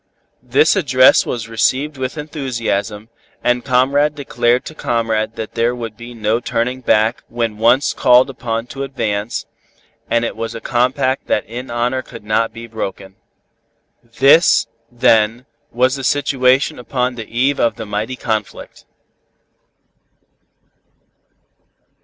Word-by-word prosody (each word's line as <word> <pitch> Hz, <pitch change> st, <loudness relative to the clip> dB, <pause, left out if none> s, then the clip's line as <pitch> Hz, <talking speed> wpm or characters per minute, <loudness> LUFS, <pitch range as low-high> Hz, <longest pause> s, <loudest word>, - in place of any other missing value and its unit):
This 135 Hz, +8 st, +3 dB
address 130 Hz, -8 st, +4 dB
was 115 Hz, -2 st, -3 dB
received 130 Hz, +6 st, 0 dB
with 130 Hz, +3 st, -4 dB
enthusiasm, 115 Hz, -8 st, -3 dB, 0.3 s
and 125 Hz, 0 st, +1 dB
comrade 140 Hz, +3 st, +2 dB
declared 125 Hz, -3 st, 0 dB
to -, -, -7 dB
comrade 115 Hz, -5 st, -1 dB
that 110 Hz, -, -6 dB
there 120 Hz, +2 st, 0 dB
would 115 Hz, -3 st, -6 dB
be 120 Hz, +1 st, -10 dB
no 110 Hz, +1 st, 0 dB
turning 125 Hz, +2 st, -2 dB
back 110 Hz, 0 st, +2 dB
when 115 Hz, -3 st, -3 dB
once 120 Hz, +5 st, +3 dB
called 125 Hz, +1 st, +5 dB
upon 115 Hz, -3 st, -4 dB
to 135 Hz, -, -6 dB
advance, 115 Hz, -5 st, -3 dB, 0.6 s
and 115 Hz, 0 st, +1 dB
it -, -, -4 dB
was 115 Hz, +1 st, -5 dB
a -, -, -5 dB
compact 130 Hz, +3 st, 0 dB
that 105 Hz, -, 0 dB
in 125 Hz, +3 st, -7 dB
honor 120 Hz, +2 st, -1 dB
could 115 Hz, -3 st, -12 dB
not 110 Hz, +2 st, 0 dB
be 115 Hz, +1 st, -9 dB
broken. 95 Hz, -4 st, -6 dB, 0.9 s
This, 135 Hz, +8 st, +4 dB, 0.3 s
then, 115 Hz, 0 st, +2 dB, 0.3 s
was 130 Hz, +3 st, +1 dB
the 135 Hz, -, -6 dB
situation 135 Hz, 0 st, +2 dB
upon 125 Hz, 0 st, -2 dB
the 115 Hz, -3 st, -8 dB
eve 130 Hz, +4 st, 0 dB
of 115 Hz, -, +2 dB
the 115 Hz, -, -7 dB
mighty 105 Hz, +4 st, -3 dB
conflict. 110 Hz, -4 st, -5 dB
120 Hz, 130 wpm, -18 LUFS, 115-130 Hz, 0.9 s, called